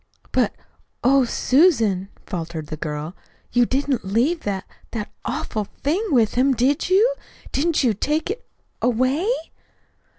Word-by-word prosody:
"But, -, -, +1 dB, 0.5 s
oh, 270 Hz, +1 st, +5 dB
Susan," 230 Hz, -, +3 dB, 0.2 s
faltered 165 Hz, -4 st, -4 dB
the 155 Hz, -, -3 dB
girl, 150 Hz, +2 st, -4 dB, 0.4 s
"you 245 Hz, -1 st, +4 dB
didn't 270 Hz, -1 st, 0 dB
leave 235 Hz, -, +1 dB
that 195 Hz, -5 st, -3 dB, 0.3 s
that 215 Hz, -2 st, -4 dB
awful 215 Hz, -2 st, -2 dB, 0.2 s
thing 325 Hz, +10 st, +1 dB
with 235 Hz, -, +3 dB
him, 265 Hz, +2 st, +3 dB
did 275 Hz, +8 st, +1 dB
you? 425 Hz, +7 st, +5 dB, 0.4 s
Didn't 310 Hz, +2 st, +1 dB
you 240 Hz, -4 st, +3 dB
take 305 Hz, -, -1 dB
it 450 Hz, -, -6 dB, 0.4 s
away?" 255 Hz, -, +2 dB
250 Hz, 130 wpm, -22 LUFS, 205-295 Hz, 0.5 s, oh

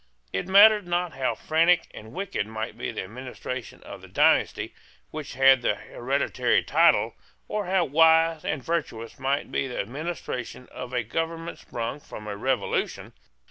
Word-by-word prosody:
It 95 Hz, -, -2 dB
mattered 205 Hz, 0 st, +7 dB
not 175 Hz, 0 st, -1 dB
how 135 Hz, -1 st, -1 dB
frantic 165 Hz, +2 st, +3 dB
and 110 Hz, +1 st, -11 dB
wicked 195 Hz, -, -3 dB
might 110 Hz, 0 st, -5 dB
be -, -, -4 dB
the -, -, -4 dB
administration 125 Hz, +3 st, -7 dB
of -, -, -10 dB
the -, -, -12 dB
dynasty -, -, +2 dB, 0.4 s
which 155 Hz, -5 st, -7 dB
had 135 Hz, -1 st, +6 dB
the -, -, +1 dB
hereditary -, -, 0 dB
title, -, -, +3 dB, 0.3 s
or 210 Hz, -3 st, -3 dB
how 185 Hz, -2 st, +2 dB
wise 160 Hz, +2 st, +4 dB
and 145 Hz, -4 st, -2 dB
virtuous 120 Hz, -10 st, -3 dB
might 140 Hz, +2 st, -1 dB
be 135 Hz, -, -1 dB
the 125 Hz, -, -5 dB
administration 125 Hz, -1 st, -5 dB
of 125 Hz, -1 st, -7 dB
a 125 Hz, -2 st, 0 dB
government 165 Hz, +7 st, -4 dB
sprung 120 Hz, +4 st, -5 dB
from 105 Hz, -6 st, -10 dB
a 105 Hz, -1 st, -4 dB
revolution. 130 Hz, +5 st, -2 dB
140 Hz, 155 wpm, -26 LUFS, 125-170 Hz, 0.4 s, mattered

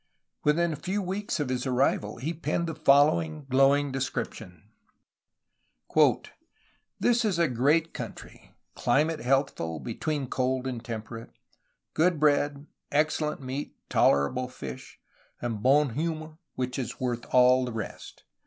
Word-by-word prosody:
'' -, -, -55 dB
Within 165 Hz, +3 st, +2 dB
a -, -, -5 dB
few 190 Hz, +6 st, -2 dB
weeks 195 Hz, -1 st, -3 dB
of 145 Hz, -3 st, -1 dB
his 130 Hz, +1 st, -2 dB
arrival 125 Hz, -5 st, +1 dB
he 145 Hz, +8 st, -3 dB
penned 170 Hz, +1 st, -2 dB
the 165 Hz, -, -3 dB
following 155 Hz, +1 st, +3 dB
glowing 135 Hz, +2 st, +4 dB
description: 115 Hz, -9 st, -5 dB, 2.3 s
"This 240 Hz, 0 st, +3 dB
is 205 Hz, -6 st, +1 dB
a 170 Hz, -1 st, +3 dB
great 145 Hz, +6 st, +2 dB
country; -, -, -9 dB, 0.2 s
climate 155 Hz, +2 st, +1 dB
healthful, 125 Hz, -, 0 dB
between 140 Hz, -, -3 dB
cold 130 Hz, +1 st, -1 dB
and 125 Hz, -3 st, -4 dB
temperate; 115 Hz, 0 st, -7 dB, 0.6 s
good 170 Hz, 0 st, +2 dB
bread, 145 Hz, -1 st, +2 dB, 0.3 s
excellent 150 Hz, 0 st, 0 dB
meat, 130 Hz, +3 st, -5 dB
tolerable 125 Hz, -, +2 dB
fish; 70 Hz, -, -9 dB, 0.4 s
and 115 Hz, -4 st, -3 dB
bon 140 Hz, +1 st, +4 dB
humeur 155 Hz, +1 st, -4 dB, 0.2 s
which 125 Hz, +1 st, -3 dB
is 125 Hz, -, -5 dB
worth 120 Hz, -2 st, -2 dB
all 125 Hz, 0 st, +5 dB
the 125 Hz, -, -4 dB
rest. 110 Hz, -2 st, -7 dB
140 Hz, 130 wpm, -27 LUFS, 125-155 Hz, 2.3 s, all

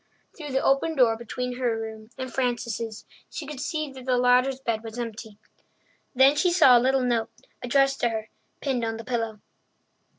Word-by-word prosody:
Through 300 Hz, -4 st, -8 dB
the 265 Hz, -, +1 dB
open 295 Hz, +4 st, +2 dB
door 240 Hz, -5 st, +4 dB
between 245 Hz, +2 st, -5 dB
her 240 Hz, -3 st, 0 dB
room 220 Hz, -1 st, -7 dB
and 260 Hz, -1 st, -6 dB
Frances's 235 Hz, -3 st, -2 dB, 0.2 s
she 310 Hz, -, -6 dB
could 290 Hz, -2 st, -7 dB
see 305 Hz, -1 st, -3 dB
that 260 Hz, -1 st, -11 dB
the 255 Hz, -1 st, +2 dB
latter's 250 Hz, +2 st, +3 dB
bed 230 Hz, -4 st, -2 dB
was 225 Hz, 0 st, -8 dB
empty. 220 Hz, -3 st, -6 dB, 0.8 s
Then 265 Hz, +3 st, +6 dB
she 350 Hz, +4 st, +2 dB
saw 320 Hz, -8 st, +7 dB
a 240 Hz, -, +5 dB
little 265 Hz, +1 st, +2 dB
note, 230 Hz, -2 st, 0 dB, 0.3 s
addressed 275 Hz, +2 st, +2 dB
to 240 Hz, -, +2 dB
her, 220 Hz, -1 st, -4 dB, 0.3 s
pinned 260 Hz, -4 st, -1 dB
on 225 Hz, 0 st, -2 dB
the 225 Hz, -, -8 dB
pillow. 225 Hz, -3 st, -3 dB
250 Hz, 185 wpm, -26 LUFS, 225-270 Hz, 0.8 s, saw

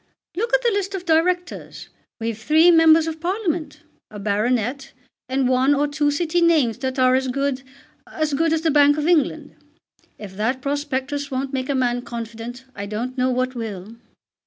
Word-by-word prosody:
"Look 455 Hz, +5 st, -2 dB
at -, -, +2 dB
the 475 Hz, -, +3 dB
list 395 Hz, -1 st, -2 dB
of 365 Hz, -1 st, -6 dB
Directors. 355 Hz, +2 st, -1 dB, 0.3 s
We've 225 Hz, 0 st, -2 dB
three 310 Hz, +10 st, +4 dB
members 325 Hz, -1 st, +6 dB
of 320 Hz, -1 st, -5 dB
Parliament, 340 Hz, -5 st, -2 dB, 0.3 s
a 215 Hz, -, -10 dB
baronet, 235 Hz, +6 st, -1 dB, 0.4 s
and 260 Hz, 0 st, +1 dB
one 260 Hz, +3 st, +3 dB
or 290 Hz, +1 st, +1 dB
two 290 Hz, 0 st, 0 dB
City 335 Hz, +3 st, 0 dB
names 310 Hz, -9 st, +3 dB
that 260 Hz, 0 st, -3 dB
are 255 Hz, -1 st, +4 dB
as 260 Hz, 0 st, +1 dB
good 275 Hz, +1 st, -1 dB, 0.5 s
as 310 Hz, -2 st, -2 dB
good 325 Hz, +3 st, +1 dB
as 320 Hz, -1 st, +1 dB
the 325 Hz, -1 st, +1 dB
Bank 290 Hz, 0 st, +5 dB
of 300 Hz, -, -1 dB
England. 310 Hz, -3 st, +1 dB, 0.6 s
If 195 Hz, -3 st, -10 dB
that 230 Hz, +5 st, 0 dB
prospectus 285 Hz, 0 st, -3 dB
won't 270 Hz, 0 st, -3 dB
make 260 Hz, 0 st, -3 dB
a 280 Hz, -, +1 dB
man 245 Hz, -2 st, 0 dB
confident 235 Hz, +1 st, -7 dB
I 200 Hz, 0 st, -6 dB
don't 235 Hz, +5 st, -4 dB
know 255 Hz, 0 st, +1 dB
what 255 Hz, 0 st, -1 dB
will. 220 Hz, -3 st, -7 dB
275 Hz, 180 wpm, -22 LUFS, 250-315 Hz, 0.6 s, members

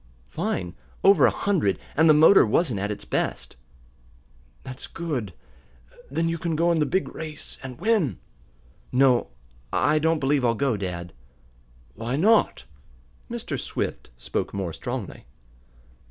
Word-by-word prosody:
"Fine. 170 Hz, -, -3 dB, 0.3 s
Over 195 Hz, +1 st, +6 dB
a -, -, +4 dB
hundred, 160 Hz, -, 0 dB, 0.2 s
and 160 Hz, +2 st, +5 dB
the 155 Hz, -, +7 dB
motor 160 Hz, +6 st, +7 dB
wasn't 115 Hz, -, +1 dB
at 100 Hz, +1 st, -2 dB
its 105 Hz, -, -5 dB
best." -, -, -3 dB, 1.1 s
"That's 130 Hz, 0 st, -8 dB
good. 145 Hz, -, -4 dB, 0.8 s
Then 165 Hz, +5 st, 0 dB
you 165 Hz, 0 st, -2 dB
can 165 Hz, -1 st, -2 dB
go 170 Hz, +2 st, +2 dB
in 165 Hz, -, +1 dB
the 150 Hz, -, +2 dB
big 190 Hz, 0 st, -1 dB
race, 155 Hz, -2 st, -8 dB
and 130 Hz, -2 st, -8 dB
win." 190 Hz, -, +1 dB, 0.7 s
"No, 125 Hz, -1 st, +4 dB, 0.4 s
I 155 Hz, -, +2 dB
don't 160 Hz, +1 st, +2 dB
believe 140 Hz, -1 st, +1 dB
I'll 115 Hz, -1 st, +2 dB
go, 135 Hz, 0 st, +1 dB
dad." 90 Hz, -3 st, -5 dB, 0.8 s
"Why 115 Hz, -, -3 dB
not?" 210 Hz, +9 st, +3 dB, 0.6 s
Mr. -, -, -4 dB
Swift -, -, -4 dB
spoke -, -, -4 dB
more 95 Hz, -4 st, -3 dB
strongly. 120 Hz, -, -6 dB
140 Hz, 140 wpm, -25 LUFS, 110-165 Hz, 1.1 s, the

